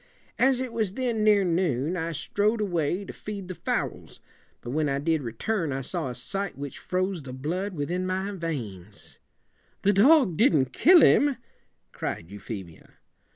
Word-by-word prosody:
As 260 0 +4
it 255 -2 -4
was 215 -4 -1
then 240 -4 -1
near 210 -2 +5
noon, 170 -4 0
I 165 -1 -2
strode 210 +8 0
away 180 -1 -1
to - - -8
feed 200 -3 -7
the 185 - -5
fowls; - - -3 0.4
but 120 - -6
when 150 +1 0
I 140 - 0
did 160 +2 0
return 155 - -2
I 135 +1 -2
saw 135 - -3
a 125 - -6
sight 195 +2 -4
which 140 -1 -6
froze 185 -1 -2
the 130 -2 -8
blood 175 +9 -3
with 145 +1 -3
in 185 +1 -1
my 190 +2 -2
veins 115 - -6 0.3
'" - - -39
"The 205 - +4
dog 230 - +5
didn't 150 - +3
kill 345 +4 +7
him?" 285 -3 +5 0.5
cried 85 +2 -5
Euphemia. 95 -4 -9
180 Hz, 170 wpm, -26 LUFS, 140-205 Hz, 0.5 s, kill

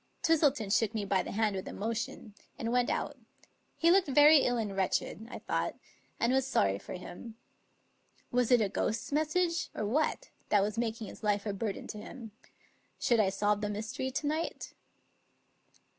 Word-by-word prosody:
Twistleton 290 -10 +3
shook 225 +1 +2
me 210 -2 -1
by 195 -1 +2
the - - -6
hand 210 -1 +1
with 190 - -5
emotion, 225 0 -4 0.2
and 230 -4 -2
went 245 0 +2
out; - - -2 0.6
he 335 +1 +4
looked 380 -1 +4
very 295 +2 +7
ill 245 -2 +1
and 210 -4 -2
wretched, 195 +3 -1
I - - -6
thought, - - -2 0.4
and 235 +2 +2
was 265 0 +2
sorry 100 - +2
for - - -8
him. 185 +5 -9 1.0
Was 245 -1 +2
it 245 -3 +5
a 205 - +1
ghost's 215 +4 -2
message 330 +3 +1
or 215 - -2
what,. 310 - 0 0.2
that 205 -2 +4
was 210 +1 -2
making 230 -1 -2
his - - -11
life 205 -1 0
a 205 - -1
burden 200 0 -3
to 215 - -7
him? 225 +1 -9 0.7
Should 235 -2 +2
I 200 -3 +4
solve 205 +1 +1
the 210 - -1
mystery 220 +5 -3
to 275 +3 -3
night? 310 +3 -3
225 Hz, 175 wpm, -31 LUFS, 205-265 Hz, 1.0 s, very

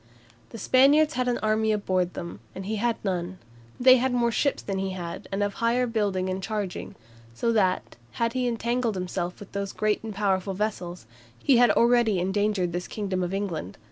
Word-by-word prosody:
The - - -9
Spaniards 285 +7 +4
had 255 -3 -1
an 245 - +1
army 215 0 +2
aboard 185 -4 0
them, 170 - -6 0.2
and 190 - -6
he 215 +2 -2
had 235 +2 +1
none; 185 -1 -2 0.4
they 255 +1 +7
had 260 +1 +1
more 240 -1 +2
ships 280 +4 0
than 195 -1 -3
he 190 0 -2
had, 175 +2 -6
and 195 +1 0
of 205 0 -1
higher 235 +2 +1
building 205 -5 -1
and 185 0 -2
charging; 205 -2 -4 0.4
so 230 - +1
that, 190 - 0 0.2
had 230 0 -1
he 255 -1 0
entangled 235 -1 -1
himself 180 -1 -3
with 205 - -11
those 200 0 -4
great 215 -1 0
and 220 -2 -6
powerful 195 -1 0
vessels, 180 - -3 0.3
he 265 - +3
had 245 0 +6
greatly 235 -4 +4
endangered 190 -1 0
this 180 +1 -3
kingdom 195 -3 -3
of 175 0 -2
England. 190 - -3
205 Hz, 190 wpm, -26 LUFS, 185-235 Hz, 0.4 s, they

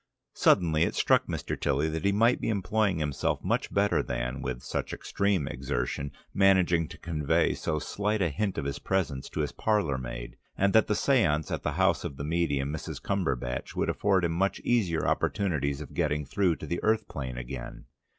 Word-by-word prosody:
Suddenly 80 -4 +3
it 85 - +2
struck - - +3
Mr. - - -3
Tilly 70 +4 0
that 80 +1 -3
he 100 - +3
might 115 +5 +3
be - - -1
employing 100 -1 +1
himself 75 -3 -1
much - - 0
better 100 +1 +2
than, 60 +2 -3
with 65 -1 -4
such - - -3
extreme 100 -7 0
exertion, 70 0 -3 0.2
managing 90 -4 +4
to - - -11
convey 75 -4 +1
so 80 -2 -2
slight 105 +7 -1
a 90 -4 +2
hint 100 +6 -2
of - - -2
his 70 0 -3
presence 80 -9 -1
to 80 - -2
his 75 - -2
parlour 95 -12 0
maid, - - -7 0.2
and 100 0 +2
that 110 - +5
the 105 - +1
séance 90 - +2
at - - -2
the - - -2
house - - +2
of 70 - -5
the - - -5
medium, 75 -3 0
Mrs. 80 - -5
Cumberbatch, 65 -11 -2
would - - 0
afford 95 -3 +2
him 85 - 0
much 95 +4 0
easier 95 -10 +1
opportunities 75 -8 0
of 75 - -9
getting 75 0 0
through 90 +4 +1
to - - -8
the 85 - -3
earth 110 0 +2
plane 65 -3 -5
again. 60 0 -7
80 Hz, 190 wpm, -28 LUFS, 70-100 Hz, 0.2 s, that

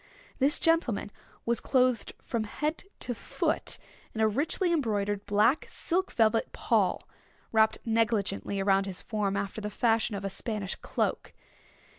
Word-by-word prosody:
This 280 +2 +4
gentleman 270 -11 +2 0.3
was 235 -1 +1
clothed 255 -4 +1
from 230 -2 -2
head 300 - -3 0.2
to 245 - -2
foot 230 - -1 0.4
in - - -4
a 220 - +5
richly 320 - +1
embroidered 205 -8 0
black 215 +8 +3
silk 370 +3 -1
velvet 225 0 +2
pall, - - +1 0.4
wrapped 220 -1 +4
negligently 215 - 0
around 195 0 +3
his 185 -1 -6
form 205 -3 -1
after 200 +2 -3
the 210 - -3
fashion 225 0 +1
of 200 0 -4
a - - -1
Spanish 205 -1 -3
cloak. - - -2
220 Hz, 140 wpm, -29 LUFS, 200-245 Hz, 0.4 s, a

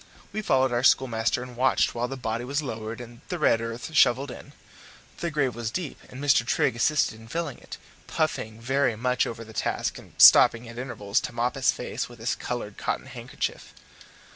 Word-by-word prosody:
We 215 - -2
followed 130 -9 +2
our 120 0 +1
schoolmaster 120 -2 +2
and 125 -1 -10
watched 130 +2 +2
while 120 +1 -2
the 135 +1 -6
body 115 -1 -3
was 140 +4 -2
lowered 110 -3 -5
and 120 -1 -11
the 180 - -2
red 115 -8 +3
earth 115 +6 -6
shovelled 135 -1 +4
in. - - -11 0.7
The 170 - -2
grave 145 -5 0
was 115 -1 -4
deep, 165 +3 -5
and 125 - -10
Mr. 140 -3 +3
Trigg 120 +1 +1
assisted 120 -2 +1
in 110 - -14
filling 160 0 -4
it, - - -10 0.3
puffing 110 0 -2
very 135 0 +1
much 125 +3 0
over 115 0 -6
the 110 0 -13
task - - -2
and - - -17
stopping 115 +1 +8
at 115 +1 -8
intervals 115 -4 -1
to - - -6
mop 120 +1 0
his 135 -1 +2
face 125 - -5
with 120 - -13
his 115 0 -1
coloured 115 -5 -5
cotton - - -2
handkerchief. - - -5
120 Hz, 195 wpm, -26 LUFS, 115-135 Hz, 0.7 s, stopping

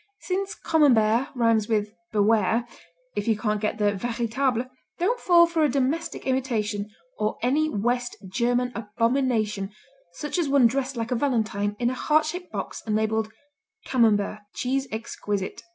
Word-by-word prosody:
Since 385 +1 -2
Camembert 245 -6 +3
rhymes 230 -3 +2
with 210 -1 0 0.2
beware, 220 +2 +2 0.5
if 205 - -2
you 220 -2 +3
can't 210 -1 -1
get 215 0 -1
the 205 -1 +2
véritable 240 +3 -1 0.3
don't 465 +8 +1
fall 345 -1 +6
for 335 -2 0
a 300 - +4
domestic 280 +5 -1
imitation 230 -6 -1 0.3
or 215 0 0
any 300 +6 +2
West 245 +2 -1
German 245 +4 0
abomination 230 -2 0 0.4
such 295 - -3
as 320 -5 0
one 275 -3 +5
dressed 265 +2 0
like 230 +1 -3
a - - +2
valentine 220 -6 0
in 240 +1 +1
a - - -2
heart 305 +4 +2
shaped 355 +3 -5
box - - -5
and 210 - +1
labeled 220 0 0 0.5
"Camembert 215 -4 +2 0.2
Cheese 265 +2 -1
Exquisite." 205 -2 -4
235 Hz, 150 wpm, -25 LUFS, 215-270 Hz, 0.5 s, fall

